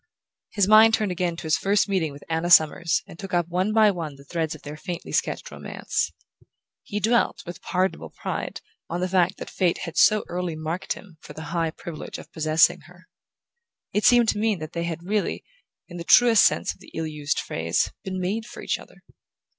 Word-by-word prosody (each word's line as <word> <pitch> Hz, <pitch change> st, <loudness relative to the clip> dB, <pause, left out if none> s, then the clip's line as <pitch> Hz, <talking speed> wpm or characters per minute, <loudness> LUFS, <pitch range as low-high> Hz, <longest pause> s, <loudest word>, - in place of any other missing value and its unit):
His 200 Hz, -3 st, +2 dB
mind 220 Hz, +1 st, +7 dB
turned 210 Hz, -3 st, -1 dB
again 180 Hz, -1 st, -1 dB
to -, -, -8 dB
his 160 Hz, 0 st, +1 dB
first 200 Hz, +2 st, +2 dB
meeting 185 Hz, -6 st, 0 dB
with 140 Hz, +1 st, -12 dB
Anna 165 Hz, +1 st, -1 dB
Summers 170 Hz, 0 st, +4 dB
and 165 Hz, -, -13 dB
took 190 Hz, -2 st, -4 dB
up 175 Hz, -1 st, +1 dB
one 185 Hz, +4 st, 0 dB
by 215 Hz, -1 st, +5 dB
one 165 Hz, -6 st, -5 dB
the 140 Hz, -, -15 dB
threads 160 Hz, +1 st, -3 dB
of -, -, -15 dB
their 150 Hz, +1 st, -7 dB
faintly 175 Hz, +2 st, -6 dB
sketched -, -, -1 dB
romance. -, -, -3 dB, 0.7 s
He 210 Hz, -, -4 dB
dwelt 230 Hz, +1 st, +1 dB
with 175 Hz, -, -8 dB
pardonable 185 Hz, +1 st, -1 dB
pride -, -, -5 dB, 0.3 s
on 175 Hz, -, -2 dB
the 185 Hz, -, 0 dB
fact 180 Hz, -2 st, +2 dB
that -, -, -7 dB
fate 180 Hz, -2 st, 0 dB
had 165 Hz, -, -8 dB
so 215 Hz, 0 st, +5 dB
early 175 Hz, -2 st, -3 dB
marked 160 Hz, +3 st, -3 dB
him 180 Hz, -6 st, -14 dB
for -, -, -11 dB
the 160 Hz, -, -8 dB
high 165 Hz, -2 st, +1 dB
privilege 160 Hz, 0 st, -8 dB
of -, -, -12 dB
possessing 155 Hz, 0 st, +3 dB
her: -, -, -18 dB, 0.9 s
it 210 Hz, -, +1 dB
seemed 240 Hz, -2 st, +6 dB
to 210 Hz, -, 0 dB
mean 215 Hz, -2 st, +1 dB
that 155 Hz, -1 st, -8 dB
they 170 Hz, 0 st, -2 dB
had 170 Hz, 0 st, -4 dB
really, 205 Hz, +3 st, -1 dB, 0.4 s
in 175 Hz, -, -9 dB
the 170 Hz, -, -5 dB
truest 230 Hz, +3 st, +6 dB
sense -, -, +1 dB
of -, -, -25 dB
the -, -, -15 dB
ill 160 Hz, -, -2 dB
used 150 Hz, -1 st, -2 dB
phrase, 85 Hz, +1 st, -1 dB
been 185 Hz, -1 st, -4 dB
made 210 Hz, +5 st, -2 dB
for -, -, -10 dB
each -, -, -1 dB
other. -, -, -16 dB
175 Hz, 210 wpm, -24 LUFS, 160-205 Hz, 0.9 s, mind